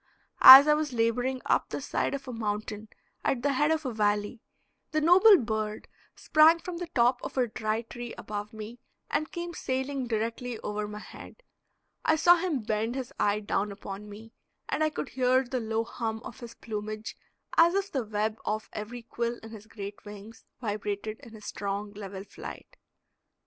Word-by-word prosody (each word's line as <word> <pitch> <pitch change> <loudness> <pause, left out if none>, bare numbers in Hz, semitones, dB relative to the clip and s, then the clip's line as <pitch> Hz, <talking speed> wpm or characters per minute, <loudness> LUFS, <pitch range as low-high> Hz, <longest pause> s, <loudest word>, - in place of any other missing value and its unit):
As 270 +3 +12
I 300 - +6
was 300 -3 -1
laboring 245 +3 0
up - - +1
the - - -4
side - - -1
of 275 -1 -8
a 250 - -5
mountain 215 -1 -4 0.4
at 245 - 0
the 285 -1 +2
head 295 +3 +2
of 320 -1 0
a 255 - -2
valley, 210 +1 0 0.5
the 310 - 0
noble 370 +6 +7
bird 215 -4 -3 0.3
sprang 315 +2 +5
from 345 0 -7
the 350 0 -5
top 245 +1 +3
of - - -7
a 255 - +3
dry 220 0 -2
tree 240 +1 -8
above 210 0 -6
me 220 +2 -9 0.3
and 310 - -1
came 345 0 -5
sailing 265 -2 -3
directly 230 +2 -2
over 210 0 -3
my 210 0 -7
head. - - -12 0.6
I 315 - +3
saw 345 +2 +6
him 330 -8 -2
bend 220 +3 -1
his 260 -2 -5
eye 205 +1 +2
down 205 0 -1
upon 200 +1 -8
me, 220 +3 -12 0.3
and 310 - 0
I 310 - +3
could 295 - -5
hear 255 0 +2
the 255 0 -3
low 225 0 -1
hum 225 -1 -4
of - - -9
his 235 -1 -10
plumage, 215 0 -6 0.4
as 340 +2 +5
if 395 0 -1
the 265 -4 -1
web 215 0 -2
off 215 +1 -3
every 230 +3 -6
quill 235 0 -3
in 225 - -10
his 220 -1 -11
great 205 -2 -8
wings 210 +2 -11
vibrated 210 -1 -4
in 245 -5 -14
his 215 -1 -12
strong, 205 +1 -4
level 195 -2 -7
flight. 355 - -10
230 Hz, 185 wpm, -28 LUFS, 210-265 Hz, 0.6 s, As